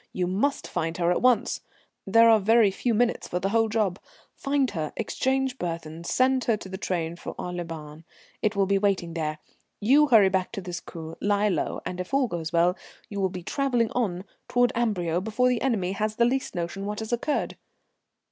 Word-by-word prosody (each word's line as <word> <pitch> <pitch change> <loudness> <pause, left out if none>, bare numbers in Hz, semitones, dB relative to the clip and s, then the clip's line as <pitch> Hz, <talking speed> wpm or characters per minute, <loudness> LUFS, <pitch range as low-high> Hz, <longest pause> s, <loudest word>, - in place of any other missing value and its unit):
You 180 - 0
must 210 +11 0
find 165 +1 -2
her 175 -1 +2
at 180 - +1
once. 250 -4 +2 0.5
There 230 +3 +6
are 225 -1 +6
very 220 0 +4
few 230 +4 -1
minutes 240 +2 +1
for 180 - -2
the 195 +2 -1
whole 225 +1 +2
job. 210 -4 0 0.3
Find 275 -2 0
her, 155 -5 -3
exchange 265 +3 -1
burthens, 165 -1 -5
send 260 0 +2
her 230 -3 +2
to 195 - -10
the 190 0 -7
train 170 -4 -2
for - - -7
Aix 180 0 -4
les 175 - -3
Bains. 155 -2 -9 0.4
It 215 -1 +1
will 200 -1 +3
be 195 0 +2
waiting 195 -4 0
there. 155 -2 -2 0.4
You 280 +8 +5
hurry 220 -7 +6
back 190 -1 -1
to 200 - -4
this 175 -1 -6
coupé, 160 -1 -9
lie 205 +1 +2
low, 190 - -2
and, 180 - -4
if 180 +8 -3
all 275 -1 +3
goes 170 -5 -4
well, 175 +1 +3 0.3
you 200 - -5
will 190 -1 +1
be 180 -1 -7
travelling 245 - 0
on 190 -7 -1 0.2
toward 245 0 +3
Amberieu 180 -8 0
before 225 +5 +1
the 245 -2 0
enemy 210 -9 0
has 215 +2 -2
the 235 - +3
least 260 -1 -1
notion 175 +3 -3
what 210 0 -3
has 220 +2 -4
occurred." 285 +5 -1
200 Hz, 205 wpm, -26 LUFS, 175-235 Hz, 0.5 s, There